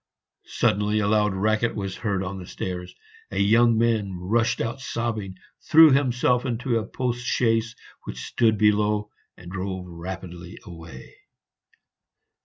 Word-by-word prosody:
Suddenly 105 Hz, +2 st, +1 dB
a 105 Hz, -1 st, +1 dB
loud 105 Hz, -2 st, +2 dB
racket 110 Hz, +4 st, +1 dB
was 100 Hz, -2 st, -4 dB
heard 100 Hz, -4 st, -1 dB
on 95 Hz, +1 st, -5 dB
the 90 Hz, -, -9 dB
stairs; 90 Hz, -1 st, -6 dB, 0.3 s
a -, -, -6 dB
young 115 Hz, +3 st, +4 dB
man 110 Hz, -5 st, +1 dB
rushed 115 Hz, +6 st, 0 dB
out 115 Hz, +4 st, -3 dB
sobbing, 110 Hz, -7 st, -3 dB, 0.3 s
threw 160 Hz, -1 st, +8 dB
himself 125 Hz, -2 st, +2 dB
into 120 Hz, -1 st, -1 dB
a 110 Hz, -, -6 dB
post 125 Hz, -1 st, -3 dB
chaise 115 Hz, -1 st, +1 dB, 0.3 s
which -, -, -6 dB
stood 110 Hz, -3 st, +2 dB
below, 105 Hz, 0 st, +2 dB, 0.3 s
and 85 Hz, 0 st, -11 dB
drove 95 Hz, -1 st, -4 dB
rapidly 90 Hz, 0 st, -8 dB
away. 80 Hz, -6 st, -11 dB
105 Hz, 135 wpm, -24 LUFS, 95-115 Hz, 0.3 s, threw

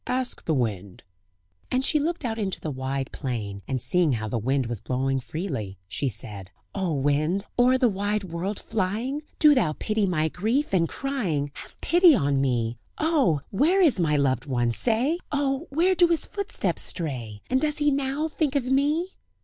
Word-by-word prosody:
"Ask 255 Hz, 0 st, -2 dB
the 160 Hz, -, +1 dB
wind." 100 Hz, -7 st, -3 dB, 0.7 s
And 255 Hz, +1 st, +1 dB
she 305 Hz, -, +3 dB
looked 320 Hz, -1 st, -2 dB
out 225 Hz, -1 st, -2 dB
into 195 Hz, -3 st, -2 dB
the 155 Hz, -, -4 dB
wide 135 Hz, 0 st, -3 dB
plain, 105 Hz, -7 st, -4 dB
and 130 Hz, -1 st, -1 dB
seeing 155 Hz, +5 st, +2 dB
how 110 Hz, -2 st, -2 dB
the 115 Hz, +2 st, -2 dB
wind 130 Hz, +4 st, 0 dB
was 115 Hz, -3 st, -5 dB
blowing 135 Hz, +1 st, 0 dB
freely, 130 Hz, -, -5 dB
she 130 Hz, +8 st, -1 dB
said: 100 Hz, -5 st, -6 dB, 0.2 s
"O 185 Hz, -5 st, -1 dB
wind! 150 Hz, +8 st, +1 dB
o'er 250 Hz, +1 st, +5 dB
the 255 Hz, -1 st, +4 dB
wide 205 Hz, 0 st, -1 dB
world 185 Hz, +3 st, -4 dB
flying! 225 Hz, +9 st, -2 dB, 0.2 s
Do 300 Hz, -1 st, +7 dB
thou 180 Hz, -, +2 dB
pity 215 Hz, -2 st, 0 dB
my 160 Hz, -3 st, +1 dB
grief 220 Hz, -, -1 dB
and 165 Hz, -3 st, +3 dB
crying! 185 Hz, -, -2 dB
Have -, -, -12 dB
pity 345 Hz, -2 st, +6 dB
on 140 Hz, -, +1 dB
me! 120 Hz, -3 st, 0 dB, 0.2 s
Oh! 285 Hz, -, +2 dB
where 310 Hz, -, +3 dB
is 315 Hz, -, +4 dB
my 155 Hz, -3 st, +2 dB
loved 135 Hz, -2 st, +1 dB
one? 120 Hz, -3 st, +1 dB
say! 245 Hz, -, +1 dB
Oh! 280 Hz, +1 st, 0 dB
where 340 Hz, +7 st, +3 dB
do 355 Hz, -1 st, +5 dB
his 335 Hz, -2 st, 0 dB
footsteps 400 Hz, 0 st, -2 dB
stray? 120 Hz, -, -4 dB
And 260 Hz, +1 st, +1 dB
does 300 Hz, -1 st, 0 dB
he 295 Hz, -1 st, +3 dB
now 280 Hz, +2 st, 0 dB
think 300 Hz, -3 st, -1 dB
of 275 Hz, -3 st, +1 dB
me?" 290 Hz, +7 st, +1 dB
190 Hz, 180 wpm, -25 LUFS, -, 0.7 s, Do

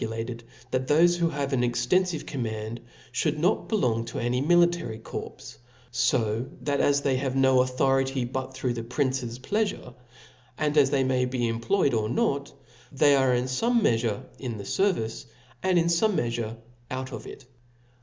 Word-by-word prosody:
lated, 115 Hz, +1 st, -4 dB, 0.3 s
that 130 Hz, 0 st, -1 dB
thofe 170 Hz, +4 st, +4 dB
who 170 Hz, -1 st, +2 dB
have 140 Hz, -2 st, -3 dB
an 125 Hz, -, +2 dB
extenfivecoramand^ 120 Hz, -4 st, -1 dB, 0.3 s
fliould 150 Hz, +3 st, 0 dB
not 180 Hz, +7 st, +1 dB
belong 120 Hz, -, +1 dB
to 115 Hz, -, -7 dB
any 120 Hz, +2 st, 0 dB
military 170 Hz, -7 st, +2 dB
corps; 110 Hz, -, -8 dB, 0.3 s
fo 120 Hz, -2 st, +1 dB
that 140 Hz, -1 st, 0 dB
as 140 Hz, 0 st, +3 dB
they 135 Hz, -2 st, +1 dB
have 130 Hz, 0 st, -2 dB
no 130 Hz, -1 st, +5 dB
authority 135 Hz, 0 st, +1 dB
but 130 Hz, +1 st, -4 dB
through 130 Hz, -1 st, -2 dB
the 115 Hz, -, -4 dB
prince's 125 Hz, -1 st, -2 dB
pleafure, 205 Hz, -, -2 dB, 0.6 s
and 150 Hz, -1 st, 0 dB
as 140 Hz, -3 st, +5 dB
they 135 Hz, -1 st, +2 dB
may 130 Hz, -1 st, +1 dB
be 125 Hz, -2 st, -1 dB
employed 120 Hz, +8 st, +1 dB
or 110 Hz, -1 st, 0 dB
not, 140 Hz, +3 st, 0 dB, 0.4 s
they 145 Hz, +1 st, +4 dB
arc 130 Hz, -2 st, +3 dB
in 125 Hz, -, -1 dB
fome 230 Hz, -, +1 dB
meafure 115 Hz, -, +1 dB, 0.2 s
in 120 Hz, -4 st, -4 dB
the 100 Hz, -, -7 dB
fervice, 115 Hz, -, -1 dB, 0.4 s
and 185 Hz, -1 st, +2 dB
in 165 Hz, -, +3 dB
fome 175 Hz, +5 st, +2 dB
meafure 115 Hz, -3 st, -2 dB, 0.3 s
out 130 Hz, +1 st, -4 dB
of -, -, -7 dB
it. 135 Hz, -, -11 dB
130 Hz, 165 wpm, -26 LUFS, 120-150 Hz, 0.6 s, no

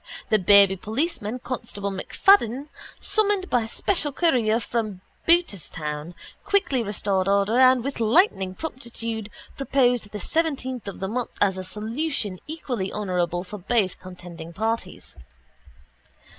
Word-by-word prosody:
The 215 Hz, -, +5 dB
baby 200 Hz, +1 st, +6 dB
policeman, 235 Hz, -, -2 dB
Constable 215 Hz, -5 st, -4 dB
MacFadden, 265 Hz, -, +3 dB, 0.3 s
summoned 410 Hz, -3 st, +1 dB
by 235 Hz, -3 st, +2 dB
special 300 Hz, -, 0 dB
courier 245 Hz, -8 st, +2 dB
from 215 Hz, -4 st, -3 dB, 0.3 s
Booterstown, 170 Hz, -, 0 dB, 0.3 s
quickly 390 Hz, -11 st, +1 dB
restored 200 Hz, -3 st, -1 dB
order 200 Hz, +4 st, +3 dB
and 255 Hz, -2 st, +6 dB
with 275 Hz, -1 st, -3 dB
lightning 220 Hz, -, +3 dB
promptitude 230 Hz, -7 st, -5 dB, 0.3 s
proposed 250 Hz, -5 st, +2 dB
the 210 Hz, -, -6 dB
seventeenth 260 Hz, -, -1 dB
of 200 Hz, -, -7 dB
the 190 Hz, -, -1 dB
month 240 Hz, +4 st, -3 dB
as 195 Hz, -2 st, +3 dB
a -, -, -4 dB
solution 215 Hz, -, -3 dB
equally 255 Hz, -11 st, -3 dB
honourable 180 Hz, -4 st, -1 dB
for 200 Hz, +3 st, -8 dB
both 195 Hz, -1 st, 0 dB
contending 175 Hz, -2 st, -10 dB
parties. 225 Hz, +5 st, -3 dB
220 Hz, 120 wpm, -24 LUFS, 195-260 Hz, 0.3 s, baby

